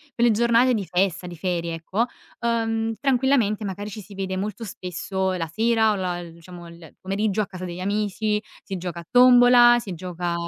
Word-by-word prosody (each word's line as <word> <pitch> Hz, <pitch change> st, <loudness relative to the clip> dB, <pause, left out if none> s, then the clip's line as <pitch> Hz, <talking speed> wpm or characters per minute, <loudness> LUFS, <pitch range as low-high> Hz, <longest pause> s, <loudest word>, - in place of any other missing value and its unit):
quelle 235 Hz, -1 st, +3 dB
giornate 235 Hz, +3 st, +3 dB
di 215 Hz, -4 st, -1 dB
festa, 180 Hz, 0 st, -1 dB
di 175 Hz, -2 st, -9 dB
ferie, 170 Hz, -1 st, -2 dB
ecco, 190 Hz, +8 st, -1 dB, 0.3 s
uhm, 225 Hz, -1 st, -1 dB
tranquillamente 250 Hz, -6 st, +1 dB
magari 200 Hz, +2 st, -5 dB
ci 210 Hz, -, -7 dB
si 200 Hz, +1 st, -13 dB
vede 190 Hz, -1 st, -3 dB
molto 205 Hz, +4 st, -4 dB
spesso 190 Hz, -1 st, -3 dB
la 175 Hz, -3 st, -2 dB
sera, 220 Hz, +5 st, +2 dB
o -, -, 0 dB
la 180 Hz, -2 st, -2 dB
il 170 Hz, -1 st, -11 dB
diciamo 175 Hz, 0 st, -11 dB
il 170 Hz, -2 st, -14 dB
pomeriggio 200 Hz, +2 st, -1 dB
a -, -, -1 dB
casa 185 Hz, -1 st, -8 dB
degli 175 Hz, 0 st, -7 dB
amici, 210 Hz, +2 st, -1 dB, 0.2 s
si 195 Hz, -, -5 dB
gioca 175 Hz, -1 st, -5 dB
a 170 Hz, -, -18 dB
tombola, 245 Hz, -1 st, +7 dB
si 200 Hz, -6 st, -7 dB
gioca 175 Hz, 0 st, -4 dB
195 Hz, 190 wpm, -23 LUFS, 180-225 Hz, 0.3 s, tombola